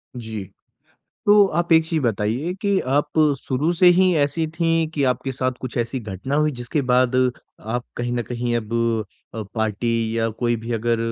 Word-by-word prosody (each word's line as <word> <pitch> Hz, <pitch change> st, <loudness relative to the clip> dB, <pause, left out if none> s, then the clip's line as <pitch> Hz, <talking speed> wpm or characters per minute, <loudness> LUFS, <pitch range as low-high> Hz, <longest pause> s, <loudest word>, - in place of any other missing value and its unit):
जी। 110 Hz, -4 st, -5 dB, 0.8 s
तो 205 Hz, 0 st, +7 dB
आप 170 Hz, -1 st, 0 dB
एक 160 Hz, 0 st, +6 dB
चीज़ 165 Hz, -1 st, 0 dB
बताइए 115 Hz, -, -1 dB
कि 200 Hz, -1 st, +2 dB
आप 145 Hz, +4 st, 0 dB, 0.2 s
शुरू 145 Hz, +6 st, -1 dB
से 180 Hz, +1 st, +3 dB
ही 185 Hz, -1 st, +4 dB
ऐसी 145 Hz, +3 st, +1 dB
थीं 165 Hz, 0 st, +1 dB
कि 145 Hz, -3 st, -2 dB
आपके 130 Hz, +1 st, 0 dB
साथ 130 Hz, +1 st, -1 dB
कुछ 130 Hz, -1 st, -6 dB
ऐसी 120 Hz, +2 st, -2 dB
घटना 105 Hz, +5 st, -5 dB
हुई 150 Hz, 0 st, +3 dB
जिसके 120 Hz, +5 st, -1 dB
बाद 125 Hz, 0 st, +3 dB, 0.4 s
आप 120 Hz, +3 st, -3 dB
कहीं 120 Hz, 0 st, -2 dB
न 120 Hz, -, 0 dB
कहीं 120 Hz, 0 st, -1 dB
अब 110 Hz, -1 st, -5 dB, 0.6 s
अ, 110 Hz, -, -3 dB
पार्टी 115 Hz, +1 st, -1 dB
या 115 Hz, 0 st, +1 dB
कोई 120 Hz, -1 st, +1 dB
भी 120 Hz, -, -3 dB
अगर 115 Hz, 0 st, 0 dB
125 Hz, 180 wpm, -22 LUFS, 115-160 Hz, 0.8 s, तो